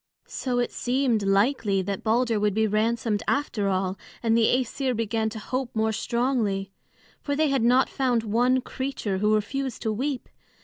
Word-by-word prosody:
So 250 -2 -3
it 245 - 0
seemed 250 -3 0
likely 200 0 +2
that 195 0 -3
Balder 230 0 +2
would 205 -1 +1
be 220 0 +3
ransomed 220 0 0
after 220 -8 0
all, 190 0 -1 0.2
and 225 -1 +3
the 230 -1 +4
Æsir 255 +1 0
began 220 0 -1
to 220 - -8
hope 255 +3 -4
more 220 0 +1
strongly. 220 -5 -1 0.5
For 285 - -2
they 310 0 +2
had 270 -2 +1
not 250 +3 +4
found 250 -4 0
one 245 +4 +2
creature 255 -8 -3
who 210 +1 +3
refused 260 +4 -3
to 220 - 0
weep. 265 +3 -3
230 Hz, 170 wpm, -25 LUFS, 210-255 Hz, 0.5 s, the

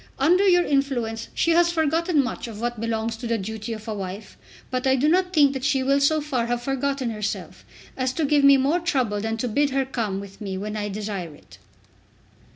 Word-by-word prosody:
Under 355 +9 +4
your 355 -1 +5
influence 245 -6 -1
she 335 - +2
has 345 +1 +4
forgotten 320 -1 +1
much 250 - -5
of 215 -2 -8
what 240 -1 -3
belongs 225 0 -2
to 235 - -6
the 230 0 0
duty 220 +3 -5
of 220 0 -7
a 220 - -2
wife, 195 +1 -7 0.4
but 255 +1 -1
I 265 - +4
do 270 +3 +1
not 360 +3 +2
think 290 -5 +4
that 265 -1 -5
she 270 -1 +1
will 275 +1 +3
so 310 +3 +3
far 260 -6 -1
have 240 0 -2
forgotten 270 -1 -1
herself 210 -1 -5 0.3
as 255 -1 -1
to 315 +2 0
give 285 0 +3
me 280 0 +8
more 280 +6 +2
trouble 255 - 0
than 225 +1 -2
to 245 - -2
bid 285 +6 +1
her 270 0 0
come 220 -7 -3
with 200 +1 -11
me 195 -2 -4
when 210 +2 -4
I 205 -1 -3
desire 200 -6 -5
it." - - -18
255 Hz, 220 wpm, -24 LUFS, 220-285 Hz, 0.4 s, me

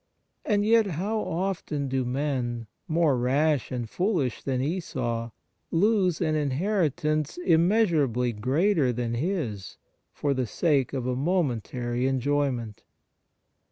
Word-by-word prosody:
And 205 -2 +1
yet 225 -1 +4
how 195 +6 -2
often 170 -7 -2
do 130 0 0
men, 125 -3 -2 0.2
more 160 -3 +2
rash 140 +3 +1
and 120 -2 -3
foolish 175 - -1
than 130 -2 -1
Esau, 130 -7 -2 0.4
lose 185 -1 +2
an 155 -3 +1
inheritance 155 0 0
immeasurably 165 - +2
greater 135 - +2
than 120 -1 -2
his 120 - -3 0.3
for 145 -1 -1
the 130 -2 -1
sake 140 - +1
of 130 -3 -2
a 125 0 0
momentary 125 - -1
enjoy 140 +2 +1
ment 115 -4 -6
145 Hz, 120 wpm, -26 LUFS, 125-175 Hz, 0.4 s, yet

